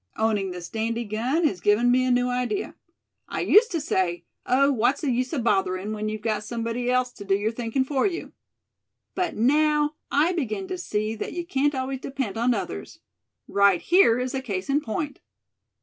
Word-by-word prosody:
Owning 215 Hz, -3 st, +1 dB
this 180 Hz, -1 st, -6 dB
dandy 230 Hz, +2 st, -2 dB
gun 240 Hz, +10 st, -1 dB
has 195 Hz, -, 0 dB
given 225 Hz, +4 st, +3 dB
me 255 Hz, +1 st, +3 dB
a -, -, +1 dB
new 245 Hz, 0 st, +2 dB
idea. 250 Hz, +11 st, -2 dB, 0.5 s
I -, -, -3 dB
used 455 Hz, +2 st, +5 dB
to 330 Hz, -, +1 dB
say 185 Hz, -, -1 dB, 0.2 s
'oh! 275 Hz, +3 st, +4 dB
what's 250 Hz, +1 st, +1 dB
the 290 Hz, -5 st, 0 dB
use 250 Hz, +1 st, -1 dB
of 275 Hz, -7 st, -2 dB
bothering, 195 Hz, -1 st, 0 dB
when 215 Hz, 0 st, -3 dB
you've 215 Hz, -1 st, -5 dB
got 215 Hz, -2 st, -1 dB
somebody 230 Hz, +2 st, -3 dB
else 250 Hz, 0 st, +1 dB
to 210 Hz, -, -10 dB
do 195 Hz, -1 st, +2 dB
your 210 Hz, +2 st, 0 dB
thinking 235 Hz, +3 st, -1 dB
for 270 Hz, +5 st, +1 dB
you?' 360 Hz, -3 st, -5 dB, 0.8 s
But 365 Hz, -2 st, -2 dB
now 300 Hz, +5 st, +3 dB, 0.2 s
I 310 Hz, +6 st, +2 dB
begin 330 Hz, -, -3 dB
to 370 Hz, -, -3 dB
see 215 Hz, -9 st, -2 dB
that -, -, -5 dB
you 345 Hz, -1 st, -4 dB
can't 290 Hz, -3 st, +1 dB
always 260 Hz, 0 st, -3 dB
depend 265 Hz, -7 st, -4 dB
on 235 Hz, +2 st, +2 dB
others. 80 Hz, -, -5 dB, 0.5 s
Right 200 Hz, -3 st, +4 dB
here 345 Hz, -10 st, +4 dB
is 250 Hz, 0 st, -2 dB
a 265 Hz, -, -2 dB
case 195 Hz, -5 st, -4 dB
in 290 Hz, +2 st, +2 dB
point." 285 Hz, +4 st, -4 dB
245 Hz, 195 wpm, -25 LUFS, 215-280 Hz, 0.8 s, used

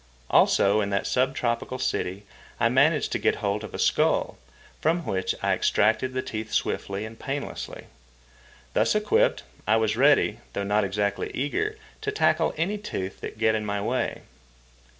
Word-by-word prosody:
Also, 100 Hz, +2 st, +4 dB
in 100 Hz, -, -1 dB
that 100 Hz, -1 st, 0 dB
sub 130 Hz, +1 st, +1 dB
tropical 120 Hz, +1 st, -1 dB
city 100 Hz, -5 st, -2 dB, 0.3 s
I -, -, +3 dB
managed -, -, +3 dB
to -, -, 0 dB
get -, -, +2 dB
hold 100 Hz, +1 st, -2 dB
of 105 Hz, -, -7 dB
a -, -, -6 dB
skull, -, -, +1 dB, 0.4 s
from 165 Hz, +1 st, +1 dB
which 95 Hz, -1 st, -1 dB
I -, -, +3 dB
extracted 115 Hz, +5 st, +1 dB
the 130 Hz, -, -1 dB
teeth 110 Hz, 0 st, -5 dB
swiftly 100 Hz, +2 st, -1 dB
and 110 Hz, 0 st, -10 dB
painlessly. 140 Hz, +1 st, -5 dB, 0.9 s
Thus -, -, +2 dB
equipped, 450 Hz, -, +2 dB, 0.2 s
I 110 Hz, -, +4 dB
was 110 Hz, -1 st, +1 dB
ready, 140 Hz, +4 st, +4 dB
though 100 Hz, -, -2 dB
not 105 Hz, +1 st, +2 dB
exactly 100 Hz, +1 st, -1 dB
eager, 425 Hz, -, -1 dB, 0.2 s
to 425 Hz, -, -1 dB
tackle 425 Hz, -, +2 dB
any 195 Hz, +6 st, -1 dB
tooth 95 Hz, -, -5 dB
that -, -, -6 dB
get 110 Hz, 0 st, +3 dB
in 110 Hz, -1 st, -1 dB
my 100 Hz, -1 st, -2 dB
way. 120 Hz, +5 st, -2 dB
110 Hz, 165 wpm, -26 LUFS, 100-135 Hz, 0.9 s, Also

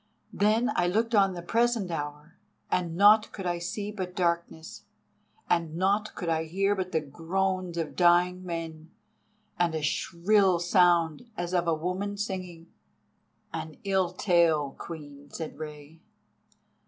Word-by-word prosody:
Then 220 Hz, +5 st, +2 dB
I 175 Hz, -, +2 dB
looked 225 Hz, +6 st, 0 dB
on 195 Hz, -3 st, +4 dB
the 175 Hz, -, -7 dB
present 230 Hz, -2 st, +1 dB
hour, 150 Hz, +1 st, -6 dB, 0.4 s
and 175 Hz, -2 st, 0 dB
naught 210 Hz, +3 st, +6 dB
could 195 Hz, -, -7 dB
I 175 Hz, -1 st, -1 dB
see 200 Hz, +4 st, -4 dB
but 185 Hz, -3 st, -5 dB
darkness, 170 Hz, -2 st, -2 dB, 0.6 s
and 165 Hz, -2 st, 0 dB
naught 200 Hz, +4 st, 0 dB
could 175 Hz, -, -5 dB
I 160 Hz, -1 st, 0 dB
hear 195 Hz, +5 st, +1 dB
but 185 Hz, -2 st, -3 dB
the 160 Hz, -, +1 dB
groans 180 Hz, +4 st, -2 dB
of 160 Hz, -3 st, -3 dB
dying 180 Hz, +1 st, +3 dB
men, 165 Hz, -2 st, -6 dB, 0.7 s
and 170 Hz, -2 st, +1 dB
a 155 Hz, -, -3 dB
shrill 185 Hz, +5 st, +2 dB
sound 175 Hz, +2 st, +2 dB
as 175 Hz, +1 st, -3 dB
of 175 Hz, -1 st, +1 dB
a 165 Hz, -, +3 dB
woman 185 Hz, +5 st, -3 dB
singing." 185 Hz, -5 st, -5 dB, 0.8 s
"An 160 Hz, -2 st, -6 dB
ill 190 Hz, -3 st, +1 dB
tale, 170 Hz, -7 st, +2 dB
Queen," 145 Hz, -3 st, -9 dB
said 155 Hz, -1 st, -7 dB
Rei. 150 Hz, 0 st, -9 dB
175 Hz, 140 wpm, -28 LUFS, 165-195 Hz, 0.8 s, naught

